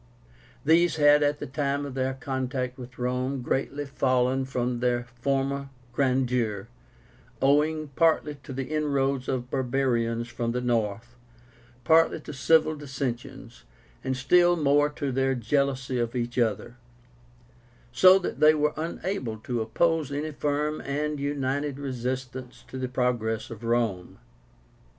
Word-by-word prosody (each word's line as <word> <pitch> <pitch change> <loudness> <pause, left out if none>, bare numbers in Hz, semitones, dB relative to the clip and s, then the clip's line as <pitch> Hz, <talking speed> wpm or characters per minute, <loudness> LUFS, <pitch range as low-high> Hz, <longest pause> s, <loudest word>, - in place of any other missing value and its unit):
These 165 +2 +4
had, 145 -1 +5
at 145 0 +2
the - - -5
time 140 +1 -1
of 140 - -6
their 130 0 -1
contact 130 -1 -3
with 125 +1 -10
Rome, 125 +1 -2
greatly 140 +3 -2
fallen 130 -1 +1
from 125 -2 -2
their 120 0 +1 0.2
former 140 +1 -1 0.2
grandeur, 125 -6 0 0.7
owing 150 +2 +2
partly 155 +1 +2
to 135 - -10
the 135 +1 -3
inroads 140 -3 0
of 125 -1 -3
barbarians 120 -3 0
from 115 -1 -3
the 125 - 0
north, 115 -1 -1 0.7
partly 160 +4 +4
to 150 - -8
civil 155 +3 +3
dissensions, 130 - -6 0.4
and 130 0 -1
still 175 +7 +4
more 145 -2 +3
to 145 -2 -3
their 135 +1 +1
jealousy 130 +1 0
of 120 +1 -2
each 120 0 -2
other; 120 +1 -1 1.1
so 185 +10 +7
that 190 - -4
they 155 0 +6
were 150 0 +1
unable 160 - -3
to 120 -1 -2
oppose 155 +6 +1
any 150 +2 -3
firm 150 +1 -1
and 150 +1 -2
united 140 0 -2
resistance 130 -1 -5
to 130 - -6
the 130 -1 -3
progress 120 -3 -1
of 115 0 -9
Rome. 115 -6 -1
135 Hz, 135 wpm, -27 LUFS, 125-145 Hz, 1.1 s, so